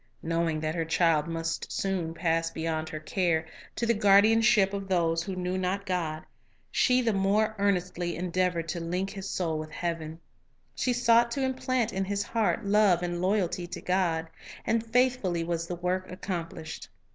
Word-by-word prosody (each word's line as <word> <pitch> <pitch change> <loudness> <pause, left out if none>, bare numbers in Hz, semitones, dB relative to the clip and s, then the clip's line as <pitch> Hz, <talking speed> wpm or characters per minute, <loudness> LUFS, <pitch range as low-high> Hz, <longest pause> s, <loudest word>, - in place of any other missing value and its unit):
Knowing 165 -1 0
that 155 0 -2
her 165 -1 -1
child 160 -1 +2
must 165 0 -3
soon 185 -4 -1
pass 165 -1 0
beyond 160 -1 -3
her 155 - -5
care, 165 0 0 0.3
to 235 - -1
the 235 - +3
guardianship 205 0 +5
of 195 -1 -4
those 165 -3 +1
who 190 +3 -4
His - - -6
\iother - - -3
s - - -4
knew 180 +1 -1
not 190 +2 -1
God, 165 -5 -2 0.5
she 255 0 +3
the 225 -2 +2
more 205 +3 +2
earnestly 180 -3 0
endeavored 180 -1 -1
to 170 - -2
link 180 +4 -2
his 195 -1 -6
soul 160 -4 -1
with 155 0 -6
heaven. 160 -1 -4 0.5
She 255 - 0
sought 235 -1 +4
to 275 - -1
implant 255 -3 0
in 190 0 -1
his 200 +1 -1
heart 225 -3 0
love 200 -4 +4
and 175 0 -2
loyalty 185 -2 0
to - - -6
God. 175 -3 0 0.4
And 230 0 +1
faithfully 230 -7 +1
was 170 0 -2
the 175 - -3
work 180 +1 -2
accomplished. 170 -4 -6
180 Hz, 180 wpm, -28 LUFS, 165-200 Hz, 0.5 s, guardianship